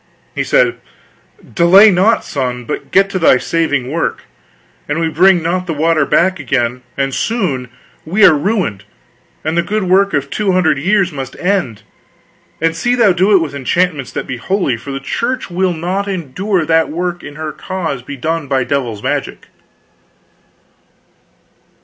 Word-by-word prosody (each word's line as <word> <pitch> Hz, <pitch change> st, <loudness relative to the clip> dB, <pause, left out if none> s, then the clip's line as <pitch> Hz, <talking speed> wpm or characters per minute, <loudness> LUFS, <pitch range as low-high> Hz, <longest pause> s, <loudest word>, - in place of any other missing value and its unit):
He -, -, -1 dB
said: -, -, +2 dB, 0.7 s
"Delay 190 Hz, +5 st, +7 dB
not, 195 Hz, +5 st, +2 dB
son, 125 Hz, -3 st, -3 dB
but -, -, -5 dB
get 195 Hz, +1 st, +4 dB
to 185 Hz, -, -2 dB
thy 165 Hz, -6 st, +5 dB
saving 145 Hz, -4 st, -1 dB
work. 165 Hz, +2 st, -2 dB, 0.7 s
An 150 Hz, -, -1 dB
we 165 Hz, -1 st, 0 dB
bring 175 Hz, +2 st, +4 dB
not 180 Hz, +2 st, -1 dB
the 165 Hz, -, -2 dB
water 155 Hz, -1 st, +2 dB
back 185 Hz, 0 st, +2 dB
again, 125 Hz, -2 st, -1 dB, 0.2 s
and 135 Hz, -1 st, -1 dB
soon, 155 Hz, -, -2 dB, 0.3 s
we 195 Hz, +7 st, +3 dB
are 175 Hz, -, +7 dB
ruined, 150 Hz, -, -1 dB, 0.6 s
and 155 Hz, +2 st, -1 dB
the 170 Hz, -, +3 dB
good 210 Hz, +4 st, -2 dB
work 195 Hz, +2 st, +2 dB
of 140 Hz, -1 st, -2 dB
two 205 Hz, -3 st, 0 dB
hundred 175 Hz, -6 st, +2 dB
years 190 Hz, +3 st, +1 dB
must 135 Hz, -3 st, -6 dB
end. 175 Hz, -, -1 dB, 0.8 s
And 165 Hz, 0 st, 0 dB
see 245 Hz, +9 st, 0 dB
thou 225 Hz, -5 st, +4 dB
do 190 Hz, +4 st, +2 dB
it -, -, +7 dB
with 150 Hz, -3 st, -4 dB
enchantments 145 Hz, +1 st, -1 dB
that -, -, -4 dB
be 130 Hz, -, -5 dB
holy, 160 Hz, -, -1 dB
for 140 Hz, +5 st, -8 dB
the 135 Hz, -, -4 dB
Church 235 Hz, -, -3 dB
will 185 Hz, +1 st, +1 dB
not 180 Hz, +5 st, -3 dB
endure 185 Hz, +1 st, -2 dB
that 160 Hz, 0 st, +2 dB
work 175 Hz, +2 st, -3 dB
in 145 Hz, -, -9 dB
her 155 Hz, 0 st, -5 dB
cause 165 Hz, -9 st, -4 dB
be 140 Hz, +3 st, -8 dB
done 160 Hz, +2 st, -2 dB
by 135 Hz, -1 st, +1 dB
devil's 125 Hz, -7 st, -3 dB
magic." -, -, -3 dB
165 Hz, 165 wpm, -15 LUFS, 140-190 Hz, 0.8 s, Delay